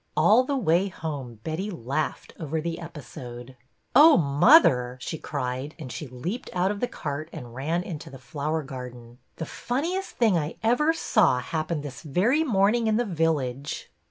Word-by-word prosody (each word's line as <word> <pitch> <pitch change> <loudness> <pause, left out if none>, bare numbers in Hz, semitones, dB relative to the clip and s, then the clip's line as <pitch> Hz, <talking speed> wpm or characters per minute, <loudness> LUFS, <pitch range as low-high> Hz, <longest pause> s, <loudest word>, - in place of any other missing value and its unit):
All 210 +11 +6
the 280 +1 -1
way 185 -4 +2
home 140 - -6
Betty 165 +6 -3
laughed 155 - -3
over 160 0 -2
the 165 +1 -3
episode. 130 -6 -9 0.2
'' - - -44
Oh, 310 +1 +9
mother," 140 - +5
she 155 +5 -5
cried, 130 +1 -4
and 145 -7 -8
she 150 - -6
leaped 130 - -5
out 185 +2 +1
of 205 - -4
the 245 - 0
cart 155 -3 -5
and 125 -7 -9
ran 160 +8 -1
into 160 -5 -7
the 135 - -10
flower 145 +5 -3
garden, 125 -3 -9
'' - - -44
the 160 - -4
funniest 335 - -3
thing 215 -8 +4
I 150 +1 -4
ever 245 +8 +3
saw 215 - +3
happened 155 +3 -3
this 140 -3 -7
very 205 - +2
morning 225 -2 +2
in 215 0 +2
the 240 - +1
village." 150 - -1
160 Hz, 175 wpm, -26 LUFS, 135-200 Hz, 0.2 s, Oh